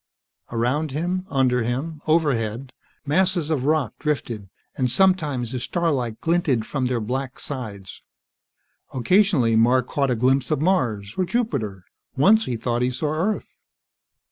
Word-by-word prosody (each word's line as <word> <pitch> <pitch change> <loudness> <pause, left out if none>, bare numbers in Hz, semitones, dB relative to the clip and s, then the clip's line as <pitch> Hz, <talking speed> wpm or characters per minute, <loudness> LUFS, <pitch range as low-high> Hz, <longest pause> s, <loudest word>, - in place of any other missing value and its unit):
Around 125 +7 0
him, 175 +6 -2
under 130 -3 +2
him, 140 +7 -3
overhead, 135 -6 0 0.3
masses 175 +1 +1
of 135 -4 0
rock 150 -5 +1
drifted, 120 - -3 0.3
and 130 -1 0
sometimes 150 -7 +2
the 130 - -3
starlight 130 -7 -1
glinted 165 - +1
from 130 -1 -1
their 125 -2 0
black 130 +4 -4
sides. 105 -9 -7 0.9
Occasionally, 135 - +3
Mark 120 +3 +4
caught 140 -2 0
a 125 - +2
glimpse 130 +4 +2
of 155 -3 +1
Mars 120 - 0
or 185 - +2
Jupiter. 135 - -2 0.3
Once 215 +10 +5
he 125 - -2
thought 120 +1 -1
he 125 - +2
saw 145 +4 -2
Earth. 190 +7 -2
135 Hz, 140 wpm, -23 LUFS, 120-160 Hz, 0.9 s, Once